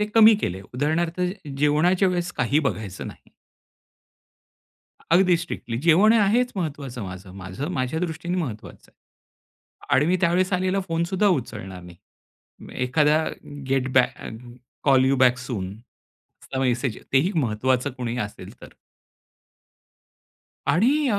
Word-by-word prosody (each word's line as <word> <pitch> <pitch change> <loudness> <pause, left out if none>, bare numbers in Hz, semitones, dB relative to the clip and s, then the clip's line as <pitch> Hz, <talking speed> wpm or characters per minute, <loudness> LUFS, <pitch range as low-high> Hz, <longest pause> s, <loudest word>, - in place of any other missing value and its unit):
ते 210 - +1
कमी 225 -1 +8
केले. 95 +2 -2
उदाहरणार्थ 165 +6 0 0.4
जेवणाच्या 175 +6 +3
वेळेस 175 -1 -2
काही 135 +3 +2
बघायचं 100 -7 -6
नाही. - - -14 1.8
अगदी 180 0 +5
स्ट्रिक्टली 160 -8 -5
जेवण 195 +7 +6
हे 230 - +4
आहेच 230 +5 +2
महत्वाचं 140 - -4
माझं, 95 +1 -9
माझं 95 - -6
माझ्या 130 +2 -2
दृष्टीने 175 +1 -3
महत्त्वाचं 120 -11 -6
आहे. - - -49 1.0
आणि 145 - +3
मी 180 +2 +3
त्यावेळेस 185 +2 +2
आलेला 185 +1 +1
फोनसुद्धा 170 +5 +1
उचलणार 105 - -3
नाही. 90 -1 -13 0.9
एखादा 150 +4 +3 0.4
get 135 -1 +1
back 130 -1 +3
a, - - -8 0.6
call 135 -2 +5
you 135 +1 +3
back 125 -1 +4
सूनचा 115 +3 -9
message 125 -2 0
ते 135 - +6
ही 175 +9 +1
महत्त्वाचं 125 +1 +1
कुणी 120 -1 -3
असेल 105 - -12
तर. - - -10 2.0
आणि 270 - +3
अ, 205 - +1
150 Hz, 125 wpm, -24 LUFS, 125-180 Hz, 2.0 s, कमी